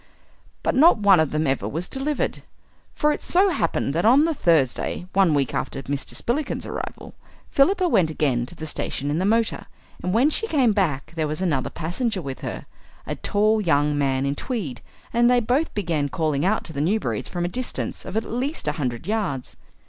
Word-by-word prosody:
But -, -, +1 dB
not 305 Hz, +2 st, +6 dB
one 200 Hz, -4 st, +5 dB
of 160 Hz, -2 st, +2 dB
them 155 Hz, +1 st, 0 dB
ever 135 Hz, -1 st, 0 dB
was 165 Hz, +4 st, -3 dB
delivered. 280 Hz, +2 st, -2 dB, 0.5 s
For 300 Hz, -, +2 dB
it -, -, -3 dB
so 385 Hz, +3 st, +3 dB
happened 165 Hz, -, 0 dB
that 170 Hz, +3 st, 0 dB
on 260 Hz, +7 st, +6 dB
the 330 Hz, -, +1 dB
Thursday, 165 Hz, -, +1 dB
one 185 Hz, -5 st, +4 dB
week 140 Hz, -3 st, 0 dB
after 135 Hz, 0 st, -3 dB
Mr. 140 Hz, 0 st, -3 dB
Spillikins's 280 Hz, +6 st, -2 dB
arrival, -, -, -6 dB, 0.4 s
Philippa 365 Hz, +6 st, +3 dB
went 185 Hz, -, +3 dB
again 130 Hz, -6 st, 0 dB
to 175 Hz, -, -12 dB
the 160 Hz, -, -7 dB
station 145 Hz, -2 st, -2 dB
in 155 Hz, -, 0 dB
the 185 Hz, -, 0 dB
motor. 225 Hz, +1 st, +1 dB, 0.3 s
And 180 Hz, -, -2 dB
when 250 Hz, +9 st, +3 dB
she 450 Hz, -, 0 dB
came 270 Hz, -, +3 dB
back 165 Hz, -8 st, -1 dB
there 160 Hz, -2 st, 0 dB
was 150 Hz, +2 st, -3 dB
another 155 Hz, -9 st, 0 dB
passenger 190 Hz, +6 st, -2 dB
with 135 Hz, -6 st, -6 dB
her, -, -, -6 dB, 0.4 s
a -, -, -3 dB
tall 215 Hz, +1 st, +1 dB
young 150 Hz, -5 st, +2 dB
man 135 Hz, -2 st, +1 dB
in 140 Hz, -, 0 dB
tweed, 150 Hz, -, -4 dB, 0.3 s
and 240 Hz, +1 st, +4 dB
they 250 Hz, 0 st, +5 dB
both 255 Hz, +8 st, 0 dB
began 165 Hz, -8 st, -1 dB
calling 155 Hz, -2 st, 0 dB
out 205 Hz, +4 st, +1 dB
to 160 Hz, -, -7 dB
the 140 Hz, -, -2 dB
Newberrys 205 Hz, +8 st, -1 dB
from 175 Hz, -1 st, -2 dB
a -, -, 0 dB
distance 250 Hz, +8 st, -4 dB
of 190 Hz, +3 st, -4 dB
at 225 Hz, -, -1 dB
least 260 Hz, +7 st, -3 dB
a -, -, +3 dB
hundred 120 Hz, -1 st, -3 dB
yards. 195 Hz, -, -2 dB
180 Hz, 200 wpm, -23 LUFS, 145-240 Hz, 0.5 s, not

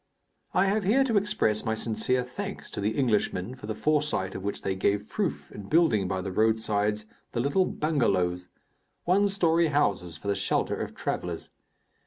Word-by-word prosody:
I 185 Hz, -, +4 dB
have 205 Hz, +2 st, +1 dB
here 235 Hz, +9 st, +4 dB
to 240 Hz, -4 st, 0 dB
express 200 Hz, -, +1 dB
my 110 Hz, -1 st, 0 dB
sincere 115 Hz, +3 st, 0 dB
thanks 195 Hz, +11 st, -6 dB
to -, -, -4 dB
the 105 Hz, +2 st, -1 dB
Englishmen 110 Hz, -4 st, 0 dB
for 130 Hz, -5 st, -10 dB
the 110 Hz, -, -3 dB
foresight 150 Hz, -9 st, 0 dB
of -, -, -6 dB
which 100 Hz, -, -4 dB
they 95 Hz, -, 0 dB
gave 100 Hz, +2 st, 0 dB
proof -, -, -3 dB
in 100 Hz, -1 st, -9 dB
building 135 Hz, -, +3 dB
by 95 Hz, 0 st, -2 dB
the 95 Hz, +1 st, -4 dB
roadsides 105 Hz, 0 st, +1 dB, 0.3 s
the -, -, -1 dB
little 140 Hz, +9 st, +2 dB
bengalows 95 Hz, -, 0 dB, 0.6 s
one 195 Hz, +4 st, +4 dB
story 170 Hz, -4 st, +3 dB
houses 120 Hz, -, 0 dB
for 100 Hz, -, -9 dB
the 100 Hz, -, +1 dB
shelter -, -, 0 dB
of -, -, -5 dB
travellers. -, -, -4 dB
110 Hz, 175 wpm, -27 LUFS, 100-165 Hz, 0.6 s, I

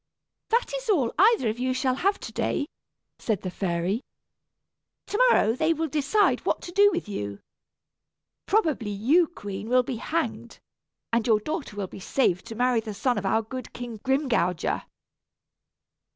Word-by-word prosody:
"That 470 Hz, +2 st, +1 dB
is -, -, -8 dB
all 280 Hz, -, +2 dB
either 420 Hz, -, +5 dB
of 220 Hz, +2 st, -2 dB
you 255 Hz, 0 st, 0 dB
shall 255 Hz, 0 st, +1 dB
have 395 Hz, +9 st, +1 dB
to -, -, -7 dB
day," 285 Hz, -, -1 dB, 0.5 s
said 215 Hz, -5 st, -1 dB
the 185 Hz, -, -3 dB
fairy. 180 Hz, +4 st, -1 dB, 1.0 s
"To 415 Hz, -, -3 dB
morrow 220 Hz, -, +4 dB
they 315 Hz, +6 st, +2 dB
will 325 Hz, +1 st, -2 dB
decide 310 Hz, +9 st, +2 dB
what -, -, 0 dB
to 350 Hz, -, -7 dB
do 405 Hz, +3 st, +6 dB
with 345 Hz, -, -3 dB
you. 100 Hz, -, -5 dB, 1.1 s
Probably 315 Hz, -, +1 dB
you, 265 Hz, -, +3 dB
queen, 205 Hz, -, -7 dB
will 250 Hz, 0 st, +4 dB
be 245 Hz, -1 st, -4 dB
hanged, 330 Hz, +8 st, -3 dB, 0.6 s
and 235 Hz, 0 st, +2 dB
your 220 Hz, -2 st, +4 dB
daughter 215 Hz, -, -4 dB
be 185 Hz, -, -10 dB
saved 185 Hz, -3 st, 0 dB
to 225 Hz, -, -7 dB
marry 245 Hz, 0 st, +2 dB
the 220 Hz, -2 st, -6 dB
son 245 Hz, +1 st, +1 dB
of 195 Hz, -, -3 dB
our 225 Hz, +3 st, +2 dB
good 255 Hz, +4 st, -7 dB
King 240 Hz, -3 st, -7 dB
Grimgouger." 255 Hz, -, 0 dB
250 Hz, 160 wpm, -26 LUFS, 210-320 Hz, 1.1 s, do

